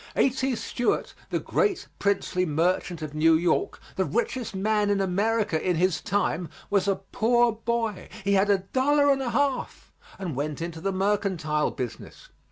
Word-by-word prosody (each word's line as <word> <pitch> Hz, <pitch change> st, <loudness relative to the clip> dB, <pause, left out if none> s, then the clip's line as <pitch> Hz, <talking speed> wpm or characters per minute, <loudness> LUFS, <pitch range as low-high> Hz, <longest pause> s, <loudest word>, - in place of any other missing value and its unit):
A.T. 265 Hz, -1 st, +2 dB
Stewart, 230 Hz, +2 st, -1 dB, 0.2 s
the -, -, 0 dB
great 415 Hz, -5 st, 0 dB
princely 200 Hz, -2 st, +1 dB
merchant 170 Hz, +1 st, 0 dB
of 150 Hz, -1 st, -6 dB
New 160 Hz, +1 st, +4 dB
York, 170 Hz, 0 st, +1 dB, 0.2 s
the 190 Hz, -, +3 dB
richest 230 Hz, +1 st, -2 dB
man 210 Hz, +1 st, +1 dB
in 200 Hz, -1 st, +2 dB
America 200 Hz, -1 st, +1 dB
in 180 Hz, -1 st, +1 dB
his 175 Hz, -2 st, +1 dB
time, 180 Hz, -4 st, -1 dB, 0.2 s
was 200 Hz, -1 st, +2 dB
a 195 Hz, -, +3 dB, 0.2 s
poor 240 Hz, +1 st, +3 dB
boy; 225 Hz, -2 st, -2 dB
he 200 Hz, 0 st, +2 dB
had 195 Hz, +1 st, +3 dB
a 200 Hz, -, +5 dB, 0.2 s
dollar 285 Hz, +2 st, +4 dB
and 270 Hz, -1 st, +1 dB
a 255 Hz, -, -1 dB
half 275 Hz, +1 st, -1 dB, 0.2 s
and 175 Hz, -7 st, -4 dB
went 145 Hz, +2 st, -3 dB
into 165 Hz, -1 st, -5 dB
the 195 Hz, +2 st, 0 dB
mercantile 185 Hz, -6 st, 0 dB
business. 125 Hz, -3 st, -7 dB
200 Hz, 165 wpm, -26 LUFS, 170-230 Hz, 0.2 s, a